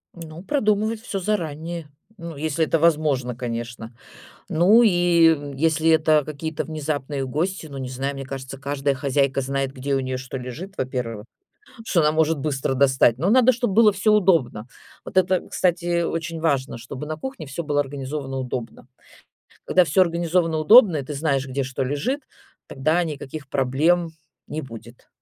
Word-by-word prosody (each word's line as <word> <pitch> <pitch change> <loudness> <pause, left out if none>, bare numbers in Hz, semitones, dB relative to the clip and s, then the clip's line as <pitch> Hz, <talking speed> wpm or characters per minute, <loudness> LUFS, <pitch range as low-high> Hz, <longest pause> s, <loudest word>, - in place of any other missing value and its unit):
Ну, 165 0 -9
продумывать 215 -4 0
всё 200 -5 -4
заранее, 170 -4 -3 0.3
ну, 170 -3 -8
если 155 +2 -1
это 165 - +1
возможно, 150 -7 +1
конечно. 120 -1 -6 0.6
Ну, 190 +8 +5
и 225 - +6 0.7
если 160 +1 +2
это 155 -2 +4
какие-то 155 +1 -4
внезапные 145 -3 -3
гости, 165 +7 -2
ну, 140 - -9
не 130 - -5
знаю, 135 +2 -3
мне 135 -1 -6
кажется, 135 0 -7
каждая 140 0 -1
хозяйка 140 0 0
знает, 135 0 -2
где 135 +1 -2
у - - +1
нее 130 -1 -3
что 130 +1 -6
лежит, 140 +11 -7
во-первых, 120 -4 -4 0.6
что 175 -6 +2
она 150 0 +3
может 160 -1 +1
быстро 135 -2 -1
достать. 130 -3 +3
Но 175 +8 +1
надо, 255 +2 +5
чтоб 240 -3 -1
было 215 0 +6
всё 210 +2 +2
удобно. 165 - +2 0.4
Вот - - -10
это, 185 -1 +3
кстати, 175 -1 0
очень 165 0 -3
важно, 140 -6 0
чтобы 130 +5 -8
на 155 0 -4
кухне 265 - -7
всё 145 +5 -5
было 145 -1 +1
организовано 135 -1 -4
удобно. 125 -2 -6 0.8
Когда 180 - +4
всё 170 +3 +2
организовано 170 -1 +1
удобно 200 - +7
и 140 - -3
ты 150 - -6
знаешь, 140 -2 0
где 135 +1 -2
что 130 0 -3
лежит, 170 - -2 0.5
тогда 155 +6 0
никаких 145 -2 -7
проблем 155 +7 +1 0.4
не 155 +1 -4
будет. 120 -2 -12
150 Hz, 160 wpm, -23 LUFS, 135-170 Hz, 0.8 s, удобно